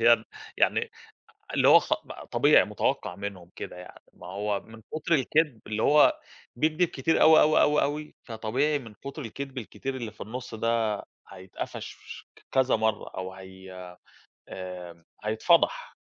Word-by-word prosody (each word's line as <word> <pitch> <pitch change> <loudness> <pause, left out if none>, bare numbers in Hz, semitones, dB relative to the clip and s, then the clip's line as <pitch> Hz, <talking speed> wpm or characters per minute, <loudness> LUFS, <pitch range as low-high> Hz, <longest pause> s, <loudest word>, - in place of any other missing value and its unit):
يالّا 115 -1 +5 0.3
يعني - - +2 0.6
اللي - - +3
هو - - +9
خ - - 0 0.4
طبيعي - - +5
مُتوقّع - - -1
منهم 100 -3 -7
كده - - -7
يعني، 90 0 -12
ما - - -12
هو 100 +2 -2
من 110 0 -14
كُتر 155 +2 -1
الكدب 145 -3 +1
اللي 110 0 -2
هو 150 0 +5 0.4
بيكدب 155 +7 +1
كتير 145 +3 0
أوي، 155 0 +8
أوي، 155 +1 +5
أوي، 150 0 +4
أوي 150 +2 -2
فطبيعي 125 +6 -1
من 115 -5 -11
كُتر 140 +7 -8
الكدب 135 +2 -7
الكتير 130 +3 -5
اللي 120 -4 -5
في 105 - -15
النُصّ 120 +2 -6
ده 110 -2 0 0.3
هيتقفش 95 0 -7 0.6
كذا 130 -1 +3
مرّه 110 -1 -1
أو 95 0 -6
هي 95 0 -12 0.8
آآ، 90 -2 -8 0.2
هيتفضح، 170 - +2
115 Hz, 145 wpm, -27 LUFS, 100-145 Hz, 0.8 s, هو